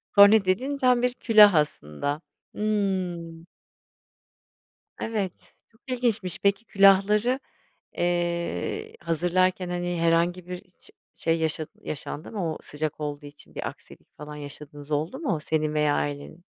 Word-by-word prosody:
Kornet 200 0 +8
dediğin 260 +10 0
tam 250 -2 +3
bir 250 0 +1
külah 215 -5 +6
aslında. 145 - -1 0.3
Hımm. 185 -6 -2 1.5
Evet, 205 -5 -4 0.2
çok 225 - -29
ilginçmiş. 235 -7 0
Peki, 200 +3 +1
külahları, 205 +6 +4 0.6
eee, 175 -1 -1
hazırlarken, 180 +2 +1
hani, 175 0 -2
herhangi 170 +2 +2
bir 180 0 -5 0.2
ş - - -14 0.2
şey 165 0 0
yaşa 160 -1 -1
yaşandı 155 +3 -6
mı? 175 -7 -2
O - - -7
sıcak 155 +1 -4
olduğu 145 0 -5
için 145 0 -14
bir - - -3
aksilik - - -15
falan 150 0 -8
yaşadığınız 145 0 -10
oldu 155 - -1
mu 275 - -1
senin 155 -1 -1
veya 150 -1 +2
ailenin? 145 +2 -3
175 Hz, 125 wpm, -26 LUFS, 155-200 Hz, 1.5 s, Kornet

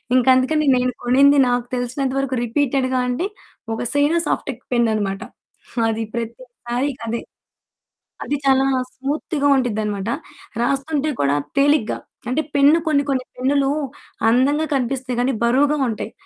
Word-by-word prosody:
ఇంక 255 -1 +3
అందుకని 300 +4 +2
నేను 250 0 +1
కొనింది. 275 +4 +5
నాకు 245 0 0
తెలిసినంత 255 +2 -2
వరకు 270 -1 -1
రిపీటెడ్‌గా 255 +1 0
అంటే, 250 +9 -1 0.5
ఒక - - -3
సేయినో 290 +4 +3
సాఫ్టెక్ 255 -3 -2
పెన్ 235 -1 +3
అనమాట. 200 -1 -2 0.5
హ్మ్. 230 - +1
అది 225 0 -1
ప్రతిసారి 240 +2 -4 0.2
అదే. 230 +1 -2 1.0
అది 290 - -1
చాలా 270 0 +4 0.3
స్మూత్‌గా 285 +2 -2
ఉండిద్దనమాట. 215 -5 -1 0.5
రాస్తుంటే 280 +4 0
కూడా 140 0 +2 0.2
తేలిగ్గా. 285 -5 +2 0.3
అంటే 270 +5 +1
పెన్ను 285 +3 +5
కొన్ని 290 -2 +3
కొన్ని 260 -2 0
పెన్నులు 275 +2 +1 0.6
అందంగా 280 +6 +3
కనిపిస్తాయి 255 -1 -2
కానీ, 260 +2 +1
బరువుగా 280 +5 +3
ఉంటాయి. 220 - -4
260 Hz, 130 wpm, -21 LUFS, 240-280 Hz, 1.0 s, కొనింది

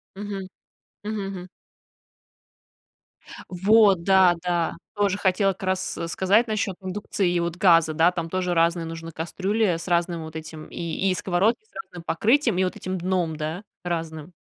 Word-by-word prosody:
Мгм. 200 -2 -5 0.6
Мгм, 210 -2 -3
мгм. 180 -1 -7 2.0
Вот, 195 0 +4
да 190 -2 +5
да. 175 -2 0 0.2
Тоже 200 -1 +1
хотела 195 0 +2
как 190 - -13
раз 185 0 -1
сказать 200 +7 +2
насчёт 210 -3 -1
индукции 190 -1 -2
и 175 - +1
вот 170 0 -2
газа. 165 -4 +5
Да, 165 +3 +4
там 170 -2 -4
тоже 180 -1 -1
разные 170 0 +2
нужны 165 0 -7
кастрюли 190 +3 0
с 170 - -8
разным 170 -1 0
вот 160 0 -10
этим 155 0 -8
и 170 +3 -2
и - - +2
сковородки 195 - +1
с - - -35
разным 175 -1 -11
покрытием 230 - +2
и - - +3
вот 185 - -1
этим 185 0 -4
дном, 175 -3 -1
да, 160 +6 -4 0.2
разным. 165 -1 -4
180 Hz, 160 wpm, -24 LUFS, 170-195 Hz, 2.0 s, да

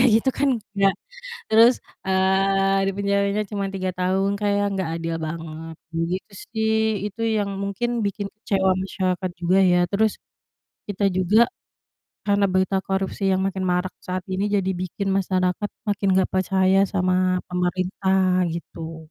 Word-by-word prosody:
aja - - +5
gitu 230 +4 +3
kan, 280 - +3 0.3
enggak 195 -1 +3 0.6
terus, 230 +3 +7 0.3
eee, 195 +1 +2
dipenjaranya 200 +1 0
cuma 200 -2 -2
3 185 -1 -1
tahun, 190 +2 +1
kayak 205 -1 +1
enggak 190 -3 -2
adil 165 0 -3
banget 160 0 -7 0.4
gitu 190 +3 -5 0.2
sih. 220 -1 +1 0.3
Itu 210 +2 -8 0.2
yang 205 -1 -1
mungkin 200 +4 -2 0.2
bikin 200 0 -3
kecewa 195 -3 0
masyarakat 185 -1 -2
juga 180 +2 +3
ya, 180 - +4
terus 215 +1 +2 0.8
kita 205 0 0
juga 185 +4 +3 0.9
karena 200 0 +3
berita 190 +1 +2
korupsi 195 +1 -2
yang 190 0 +1
makin 195 0 -2
marak 180 +1 -1
saat 185 0 -4
ini 190 +2 -1
jadi 190 -1 +1
bikin 195 +2 -3
masyarakat 185 +1 0 0.2
makin 200 -1 0
gak 185 - +1
percaya 190 0 +2 0.2
sama 185 -1 +2
pemerintah 185 +1 +1
gitu. 165 -1 -7
190 Hz, 140 wpm, -23 LUFS, 185-200 Hz, 0.9 s, terus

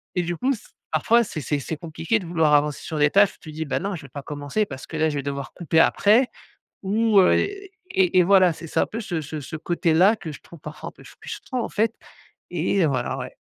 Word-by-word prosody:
et 180 - +1
du 175 +1 -2
coup 265 +2 +1
s 220 - -12 0.2
parfois 235 +1 +3
c'est 160 -7 -6
c'est 145 +1 -1
c'est 155 +3 -5
compliqué 165 +7 -1
de 180 - -9
vouloir 160 -3 +2
avancer 145 0 +2
sur 155 - -5
des 145 0 +4
tâches. 200 0 +5
Tu 155 - -10
te - - -12
dis: 160 0 -3
«Bah - - -1
non 195 +1 -3
je 155 - -9
vais 140 - -12
pas 140 +2 -8
commencer 145 +8 -2
parce 130 -5 -9
que 160 - -6
là 160 0 +2
je 145 - -4
vais 140 - -3
devoir 140 -1 -5
couper 165 -2 +1
après» 225 +9 +4 0.6
ou 215 +1 +2
heu 180 - +5
et 395 -1 -2 0.2
et 185 -1 +4
et - - +7
voilà. 185 -2 +5
C'est 165 - -9
ça - - 0
un - - +1
peu 230 - -5
ce 175 -6 -3
ce 150 0 -6
ce 155 - -7
côté-là 175 +5 +3
que 165 -7 -7
je - - -11
trouve 170 - -14
parfois 150 0 -8
un - - -11
peu - - -17
frustrant 255 -3 -6
en - - -3
fait 225 +1 0 0.6
et 175 +2 +1
heu - - +4
voilà, 130 -3 -1
ouais. - - -7
170 Hz, 260 wpm, -23 LUFS, 150-200 Hz, 0.6 s, et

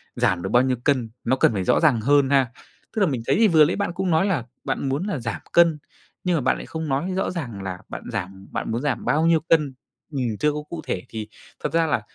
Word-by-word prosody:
giảm 95 -2 +1
được - - -3
bao 120 +1 +4
nhiêu 130 -1 +1
cân, 130 -5 +1
nó 130 - +2
cần 130 - +3
phải 95 -3 -1
rõ - - +3
ràng 140 -9 +3
hơn 140 +3 +4
ha. 135 -4 +3 0.4
Tức 220 - 0
là 195 - +5
mình 130 -6 -2
thấy - - +3
thì 225 +1 +5
vừa 160 -5 +6
nãy 165 - 0
bạn 200 -3 -1
cũng 185 -1 -1
nói 160 +4 +3
là 175 - 0 0.2
bạn 135 - -2
muốn 140 +6 -1
là 195 -9 -2
giảm 115 -2 -4
cân, 170 -2 +5 0.5
nhưng 180 -1 +1
mà - - 0
bạn 130 - +2
lại - - -7
không 160 -1 -5
nói 140 +8 0
rõ 190 - 0
ràng 120 - -5
là 95 -2 -4
bạn - - -7
giảm 95 -2 -5
bạn - - -3
muốn 115 +3 -1
giảm 145 -4 -2
bao 155 +2 +2
nhiêu 165 -1 +4
cân, 150 -4 +3 0.4
ừm, 120 -7 -2
chưa 150 - +3
có 150 0 -4
cụ 165 -2 -5
thể 90 - -1
thì 110 -1 -5 0.4
thật - - -2
ra 165 0 +3
là 120 - +1
140 Hz, 265 wpm, -23 LUFS, 115-165 Hz, 0.5 s, vừa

